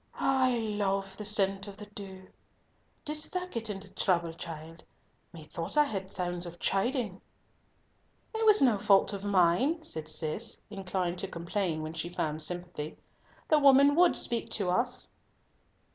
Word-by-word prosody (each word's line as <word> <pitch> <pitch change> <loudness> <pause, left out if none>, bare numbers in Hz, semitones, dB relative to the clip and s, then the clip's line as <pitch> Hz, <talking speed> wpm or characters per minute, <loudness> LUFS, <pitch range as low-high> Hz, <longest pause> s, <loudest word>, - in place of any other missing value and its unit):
"I 260 -2 +2
love 195 -3 -2
the 210 - -7
scent 195 -2 +1
of 200 -1 -9
the 210 - -9
dew. 195 -2 -10 0.8
Didst 305 +4 +2
get 225 -1 -2
into 195 -1 -6
trouble, 170 -3 +1
child? 165 -1 -8 0.5
Methought 165 - -6
I 295 - +6
heard 195 -7 -4
sounds 175 -1 -2
of 175 0 -10
chiding?" 200 +1 -1 1.1
"It 445 0 -1
was 425 -7 +6
no 235 -6 +4
fault 200 0 +4
of 200 -1 -5
mine," 205 - +2
said 160 - -4
Cis, 165 +10 0
inclined 185 -3 -3
to 195 - -3
complain 170 -2 -3
when 155 +1 -5
she 165 +1 -4
found 155 -3 -3
sympathy, 175 -2 -4 0.5
"the 310 - +4
woman 280 0 +6
would 350 +3 +4
speak 235 -1 -1
to 190 -4 0
us." 245 +6 0
195 Hz, 145 wpm, -30 LUFS, 175-230 Hz, 1.1 s, I